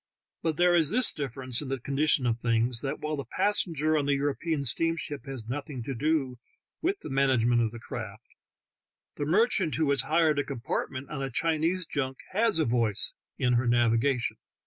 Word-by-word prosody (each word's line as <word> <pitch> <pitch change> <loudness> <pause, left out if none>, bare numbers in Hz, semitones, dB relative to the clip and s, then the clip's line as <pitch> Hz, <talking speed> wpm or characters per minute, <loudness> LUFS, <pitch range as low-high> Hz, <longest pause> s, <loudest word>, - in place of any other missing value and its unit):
But 160 -3 -1
there 175 0 +4
is 165 -4 +5
this 250 +4 +5
difference 130 -3 -2
in 145 - -6
the 135 -1 -2
condition 140 +1 +2
of 120 -1 0
things, 115 0 0
that 135 - -3
while 155 0 -2
the 140 - -4
passenger 155 - +1
on 145 -2 0
the 140 - +3
European 145 +1 -2
steam 165 +7 +2
ship 145 -4 -6
has 130 -5 -6
nothing 135 0 -5
to 135 - -4
do 135 -2 -1 0.4
with 385 +4 -1
the - - -7
management 125 -3 +2
of 115 - +1
the 120 - -10
craft, 115 - -8 0.8
the 145 - -2
merchant 190 -2 +2
who 160 -2 +1
has 140 -2 +3
hired 155 0 +2
a - - +1
compart 130 -5 -3
ment 130 0 -7
on 145 -2 -4
a 135 - -2
Chinese 165 +6 0
junk 135 -4 -3
has 220 0 +2
a 160 - +2
voice 115 -4 +1 0.2
in 125 -1 +1
her 120 +1 +1
naviga 120 +2 +2
tion. - - -3
140 Hz, 195 wpm, -28 LUFS, 125-160 Hz, 0.8 s, is